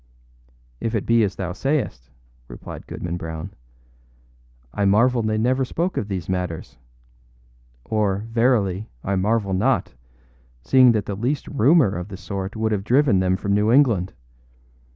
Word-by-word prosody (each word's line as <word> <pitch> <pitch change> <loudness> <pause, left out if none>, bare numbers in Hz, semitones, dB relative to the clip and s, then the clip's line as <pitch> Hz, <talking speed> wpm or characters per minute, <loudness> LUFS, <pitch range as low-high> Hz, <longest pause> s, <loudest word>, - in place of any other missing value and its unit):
â - - -1
âIf 115 - -2
it 105 - -1
be 115 -1 +4
as 100 -2 -1
thou 90 -2 -4
sayest,â 125 - -2 0.4
replied - - -10
Goodman 85 0 -5
Brown, 80 +2 -6 1.2
âI 100 -1 +2
marvel 120 +4 +3
they 110 0 -1
never 130 +4 +1
spoke 170 +8 -2
of 100 - -2
these 95 -4 -4
matters; 90 -7 -4 1.1
or, 105 -2 0
verily, 115 -4 +1
I 100 - -1
marvel 100 +1 0
not, 95 - +1 0.7
seeing 130 - +5
that 105 -2 -1
the 100 - -4
least 125 +8 -2
rumor 140 - +3
of 90 +2 -5
the 95 -2 -8
sort 95 +1 -5
would 110 0 -1
have 100 -2 -1
driven 125 -2 +3
them 95 0 +1
from 100 +1 -1
New 105 +2 +2
England. 115 -9 +3
105 Hz, 150 wpm, -22 LUFS, 95-120 Hz, 1.2 s, seeing